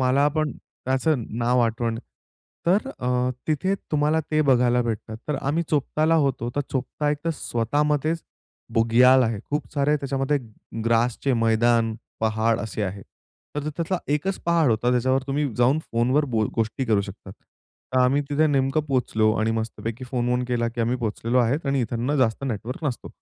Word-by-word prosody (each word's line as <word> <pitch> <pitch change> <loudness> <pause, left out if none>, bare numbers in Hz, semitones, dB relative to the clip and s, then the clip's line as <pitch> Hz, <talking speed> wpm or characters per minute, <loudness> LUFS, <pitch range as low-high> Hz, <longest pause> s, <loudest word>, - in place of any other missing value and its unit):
मला 130 +2 +3
पण 155 -1 -1
त्याचं 130 0 -2
नाव 120 +1 +2
आठवण 115 0 0 0.7
तर 200 +9 +2
अ, 125 0 0 0.2
तिथे 160 +5 +1 0.2
तुम्हाला 150 +1 +2
ते 155 0 +2
बघायला 125 -3 +3
भेटतात. 110 -1 -4
तर 150 - 0
आम्ही 150 +5 0
चोपताला 155 +2 +1
होतो, 135 -6 +1
तर - - +2
चोपता 140 +3 -1
एक 150 - -1
तर 165 - +1
स्वतःमध्येच 150 +8 0 0.5
बुग्याल 125 +3 +5
आहे. 115 -3 0
खूप 150 0 -1
सारे 150 +1 +2
त्याच्यामध्ये 140 +1 0 0.5
ग्रासचे 120 +3 +1
मैदान, 115 0 +2 0.3
पहाड 110 +1 +1
असे 110 +1 -4
आहे. 100 0 -4 0.5
तर 150 +1 -2
त्यातला 170 +4 -2
एकच 185 +6 -1
पहाड 165 -5 +3
होता 115 +2 +1
त्याच्यावर 130 +2 +2
तुम्ही 140 +1 0
जाऊन 125 +5 +3
फोनवर 125 +6 +2
बो 110 -3 +1
गोष्टी 115 +4 -1
करू 110 -4 +2
शकता. 100 -1 -8
तर 130 +5 -8
आम्ही 130 +3 +3
तिथे 155 +2 +3
नेमकं 135 0 +2
पोहोचलो 110 -5 +1
आणि 110 +1 +1
मस्तपैकी 115 +2 -4
फोन-वोन 125 0 0
केला 120 -1 0
की 120 0 -5
आम्ही 120 +2 +1
पोहोचलेलो 115 +1 -1
आहे 120 +3 +3
आणि 135 -1 +1
इथंनं 120 +4 -1
जास्त 130 -1 +1
नेटवर्क 125 +5 -4
नसतो. 130 -5 -3
125 Hz, 160 wpm, -24 LUFS, 115-145 Hz, 0.7 s, बुग्याल